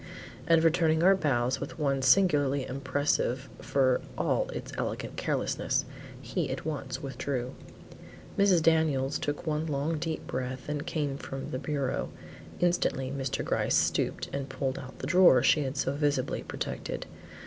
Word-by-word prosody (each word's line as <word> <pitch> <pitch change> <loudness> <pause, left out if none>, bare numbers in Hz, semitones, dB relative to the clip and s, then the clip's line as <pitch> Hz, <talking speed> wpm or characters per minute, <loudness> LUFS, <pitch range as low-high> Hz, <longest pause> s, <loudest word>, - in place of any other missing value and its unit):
And 165 -1 +5
returning 165 -1 +3
our 195 +2 +7
bows 130 -7 +1
with - - -6
one 140 -3 +1
singularly 145 -2 +4
impressive 140 -1 -1
for 130 -2 +2 0.2
all - - +1
its - - -6
elegant - - -3
carelessness, - - 0 0.3
he 150 +2 -2
at 130 +2 -4
once 145 -4 -4
withdrew. 135 -2 -3 0.8
Mrs. 190 -5 +4
Daniels 150 -4 +2
took 145 +2 -3
one 155 0 -1
long 150 +2 -1
deep 160 0 -3
breath 130 0 -4
and 145 0 -3
came 145 -3 -2
from 135 0 -6
the 130 - -2
bureau. 140 -1 -2 0.5
Instantly 155 -7 +1
Mr. 135 -1 -2
Gryce - - +1
stooped - - 0
and 140 -1 -3
pulled 130 0 -2
out 130 - -10
the - - -5
drawer 170 -5 +6
she 150 - +4
had 135 0 -3
so 135 - 0
visibly 145 -3 0
protected. - - -5
140 Hz, 150 wpm, -29 LUFS, 130-160 Hz, 0.8 s, our